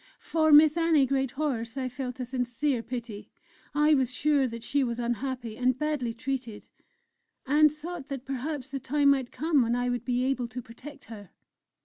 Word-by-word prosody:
For 315 -1 +1
Miss 305 +2 +7
Annie 325 -4 +4
Greathorse 265 -2 -2
I 260 -1 -1
felt 255 0 -6
a 250 - -2
sincere 250 +1 -1
pity; 235 -4 -7 0.5
I 300 +1 +4
was 260 -4 +2
sure 280 +1 +2
that 230 -1 -7
she 280 +3 +1
was 235 -1 -2
unhappy 240 -1 -3
and 255 +1 +1
badly 300 -5 -1
treated, 245 -2 -5 0.8
and 300 +2 +5
thought 305 0 -7
that 275 -3 -6
perhaps 270 0 -4
the 275 - -3
time 280 +2 +3
might 265 -3 0
come 310 -2 +2
when 235 0 +1
I 245 0 0
would 245 -2 -2
be 250 0 0
able 255 -2 0
to 235 +2 -7
protect 265 +5 -11
her. 205 -5 -11
260 Hz, 175 wpm, -28 LUFS, 245-290 Hz, 0.8 s, Miss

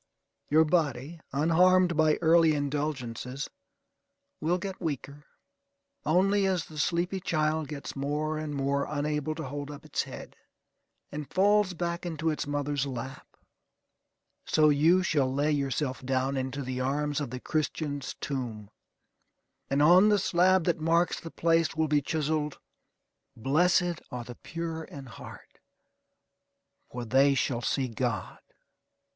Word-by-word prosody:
Your 160 +2 +5
body, 150 -1 0
unharmed 175 +4 +4
by 155 -1 +4
early 165 -1 +5
indulgences, 140 -3 -3 0.9
will 170 +3 +1
get 190 +1 -6
weaker, 145 -2 -5 0.8
only 195 +5 +3
as 185 -4 0
the 155 -1 -9
sleepy 175 +4 0
child 155 -3 0
gets 145 -1 -7
more 150 +3 -2
and 150 -1 -4
more 140 0 0
unable 150 +1 -1
to 160 - -5
hold 145 +1 -5
up 145 +1 -10
its 155 - -1
head, - - -9 0.8
and 150 -1 -6
falls 200 0 +3
back 170 0 -3
into 160 -2 -1
its 150 - -3
mother's 145 -1 -1
lap: 130 +1 -6 1.2
so 155 -1 +4
you 160 +6 +4
shall 140 -7 +1
lay 145 +3 +1
yourself 140 -2 -1
down 130 +1 0
into 130 +1 -3
the 130 0 -4
arms 145 +3 -1
of 145 - -3
the 130 - -6
Christian's 145 -1 -2
tomb, 115 -7 -5 1.0
and 140 +2 +2
on 180 +6 +7
the 210 - +4
slab 185 -1 +3
that 170 0 0
marks 165 +2 +2
the 165 - -8
place 165 0 +1
will 160 0 +1
be 145 -1 +2
chiselled: 150 0 -1 0.8
"Blessed 175 - +2
are 125 -2 -5
the 120 - -9
pure 165 -1 -5
in 140 -3 -10
heart, 120 - -12 1.3
for 120 -1 -5
they 135 +4 +4
shall 125 -2 0
see 130 +3 0
God." 115 -4 -3
150 Hz, 135 wpm, -28 LUFS, 140-165 Hz, 1.3 s, on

